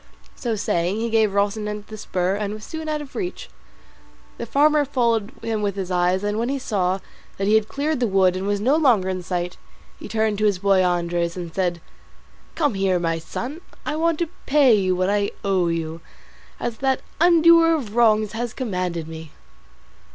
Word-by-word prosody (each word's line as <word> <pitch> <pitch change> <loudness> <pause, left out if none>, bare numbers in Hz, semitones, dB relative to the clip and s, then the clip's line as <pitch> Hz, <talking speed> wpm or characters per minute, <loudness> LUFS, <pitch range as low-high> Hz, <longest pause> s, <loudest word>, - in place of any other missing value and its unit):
So 235 -3 -2
saying, 180 -2 0
he 230 +1 -2
gave 220 -1 +3
Rocinante 210 +1 -1
the 215 - -9
spur 185 -3 -1
and 210 0 -3
was 215 - -10
soon 320 +3 -6
out 300 -1 -2
of 280 - -14
reach. 365 -3 -5 0.9
The 235 - -4
farmer 295 +4 +4
followed 235 -6 0
him 220 -2 -1
with 200 -2 -1
his 190 -2 -4
eyes, 180 +2 +1
and 205 +1 -1
when 235 +2 -1
he 275 - -1
saw 190 -7 0 0.4
that 195 - -1
he 210 - +3
had 220 -1 +3
cleared 290 +2 -1
the 245 - +1
wood 190 -2 +3
and 190 +1 -3
was 205 0 0
no 255 +8 +3
longer 240 -12 +3
in 185 -1 -2
sight, 180 0 -3 0.4
he - - -8
turned 220 -2 0
to 215 - +2
his 205 -3 +2
boy 195 0 +3
Andres, 175 -1 0
and 170 -2 -6
said, 175 -3 -1 0.7
"Come 295 -6 +1
here, 195 -2 +1
my 165 -1 -1
son, 255 - -6 0.2
I 300 - -2
want 330 0 +1
to 340 -1 -2 0.2
pay 275 -4 +5
you 190 -3 +2
what 185 +2 +1
I 205 0 +1 0.2
owe 190 -3 +2
you, 165 -1 -3 0.6
as 235 -2 -3
that 265 -1 +1 0.2
undoer 335 -1 +6
of 225 -7 -7
wrongs 215 -3 +3
has 235 +1 -4
commanded 180 - -3
me." 160 -1 -9
210 Hz, 195 wpm, -22 LUFS, 185-250 Hz, 0.9 s, undoer